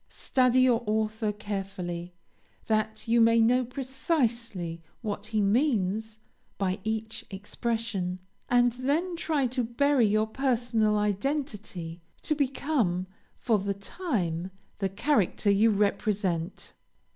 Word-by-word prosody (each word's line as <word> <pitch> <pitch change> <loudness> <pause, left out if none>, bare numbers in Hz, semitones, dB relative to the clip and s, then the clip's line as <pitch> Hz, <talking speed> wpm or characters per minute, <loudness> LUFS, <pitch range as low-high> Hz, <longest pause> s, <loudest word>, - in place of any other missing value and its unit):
Study 255 -1 +2
your 245 -2 +4
author 215 0 0
carefully, 190 -4 -5 0.5
that 220 +1 0
you 230 +1 +4
may 230 0 +5
know 245 +3 +4
precisely 240 - -2 0.2
what 210 -1 -4
he 215 -1 0
means 220 -2 +1 0.4
by 190 0 -1
each 220 +1 -3
expression, 205 -2 -2 0.3
and 245 0 +4
then 295 +8 0
try 310 -4 0
to 250 0 0
bury 245 +1 +3
your 215 +1 +2
personal 230 -3 +1
identity, 210 - -2 0.2
to 310 - +2
become, 265 - 0 0.3
for 225 -4 +2
the 200 +1 -2
time, 195 - -2 0.3
the 195 -1 0
character 205 - +1
you 210 +3 +5
represent. 200 -4 0
220 Hz, 110 wpm, -28 LUFS, 200-250 Hz, 0.5 s, may